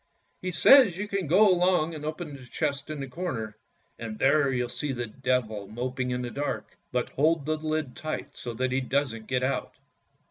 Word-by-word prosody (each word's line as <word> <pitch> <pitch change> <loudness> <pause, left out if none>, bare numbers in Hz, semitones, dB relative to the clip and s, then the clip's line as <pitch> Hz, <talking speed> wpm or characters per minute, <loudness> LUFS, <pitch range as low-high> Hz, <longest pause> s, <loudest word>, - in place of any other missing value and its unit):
" - - -43
" - - -44
He 185 - -2
says 200 +1 +7
you 205 +2 -3
can 195 -4 -2
go 195 +8 +6
along 180 -3 +3
and 150 -2 -7
open 155 -1 -5
the 135 - -11
chest 140 +1 -2
in 155 -1 -4
the 135 - -4
corner, 125 - -4 0.4
and 110 -2 -5
there 140 +2 +3
you'll 125 -1 0
see 140 +4 -3
the 120 -2 -2
Devil 115 -4 -1
moping 125 +3 -3
in 125 0 -2
the 120 - -4
dark; 145 +1 -4 0.2
but 125 0 -1
hold 155 +1 +2
the 155 +1 0
lid 155 -3 -2
tight 155 -1 -5
so 120 -1 -5
that 130 +2 0
he 130 +1 +1
doesn't 130 -4 -1
get 125 -1 0
out." 135 +1 -1
140 Hz, 210 wpm, -27 LUFS, 125-155 Hz, 0.4 s, says